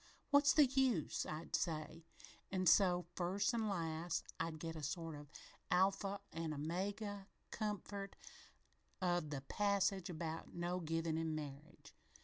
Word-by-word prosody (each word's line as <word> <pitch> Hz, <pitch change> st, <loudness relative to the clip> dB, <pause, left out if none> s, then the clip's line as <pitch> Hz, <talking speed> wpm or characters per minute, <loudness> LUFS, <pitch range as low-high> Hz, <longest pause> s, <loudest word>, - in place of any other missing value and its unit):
What's 285 Hz, 0 st, +7 dB
the 300 Hz, -, +8 dB
use?' 260 Hz, -, +1 dB
I'd 155 Hz, +2 st, -3 dB
say, 160 Hz, 0 st, -2 dB, 0.5 s
an' 185 Hz, -1 st, 0 dB
so, 180 Hz, 0 st, +5 dB
first 195 Hz, +5 st, +1 dB
an' 225 Hz, -2 st, +1 dB
last, 165 Hz, -2 st, -1 dB, 0.2 s
I'd 165 Hz, -1 st, -1 dB
get 165 Hz, +1 st, -4 dB
a 155 Hz, -, -5 dB
sort 160 Hz, +2 st, -3 dB
o' 145 Hz, 0 st, -9 dB, 0.4 s
alpha 195 Hz, +2 st, +2 dB
an' 165 Hz, -2 st, -2 dB
omega 195 Hz, +6 st, -3 dB, 0.2 s
comfort 205 Hz, -2 st, -3 dB, 0.8 s
out 175 Hz, -3 st, +2 dB
o' -, -, -7 dB
the 145 Hz, -2 st, -3 dB
passage 200 Hz, +3 st, +1 dB
about 165 Hz, -1 st, -4 dB
no 175 Hz, +1 st, -1 dB
givin' 165 Hz, -1 st, 0 dB
in 160 Hz, -1 st, -1 dB
marriage. 145 Hz, 0 st, -8 dB
175 Hz, 135 wpm, -39 LUFS, 160-200 Hz, 0.8 s, the